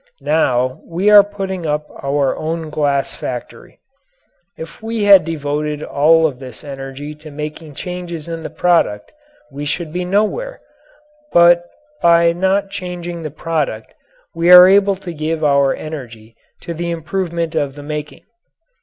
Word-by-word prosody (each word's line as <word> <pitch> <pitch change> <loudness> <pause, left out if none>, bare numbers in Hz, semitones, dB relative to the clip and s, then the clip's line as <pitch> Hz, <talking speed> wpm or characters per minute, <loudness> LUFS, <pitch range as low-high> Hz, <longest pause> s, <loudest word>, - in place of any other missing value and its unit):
Now 130 -5 +1
we 185 +5 +1
are 205 -1 +10
putting 195 -4 -5
up 150 0 -1 0.2
our 140 -1 0
own 160 0 -4
glass 140 -2 0
factory. 120 -2 -7 0.8
If 485 - -10
we 225 -1 -3
had 200 -2 +7
devoted 150 -1 -3
all 160 +3 +3
of 135 -5 -2
this 130 -4 -10
energy 135 +1 -7
to 155 +1 -13
making 150 +1 -7
changes 175 -2 -6
in 165 -1 -5
the 160 - -6
product 160 -11 +1 0.4
we 140 +2 -6
should 155 +2 -3
be 180 +1 -2
nowhere; 215 - -1 0.7
but 175 0 +5 0.3
by 170 0 +5
not 190 +3 0
changing 175 -3 -6
the 155 - -5
product 150 -7 -3 0.4
we 170 +1 +2
are 180 0 +11
able 200 +1 +4
to 185 -2 -8
give 155 +1 -3
our 140 -2 +3
energy 115 -8 -9 0.3
to 170 - -6
the 170 +1 -4
improvement 170 0 -3
of 140 -4 -2
the 145 - -10
making. 150 0 -6
160 Hz, 145 wpm, -17 LUFS, 145-180 Hz, 0.8 s, are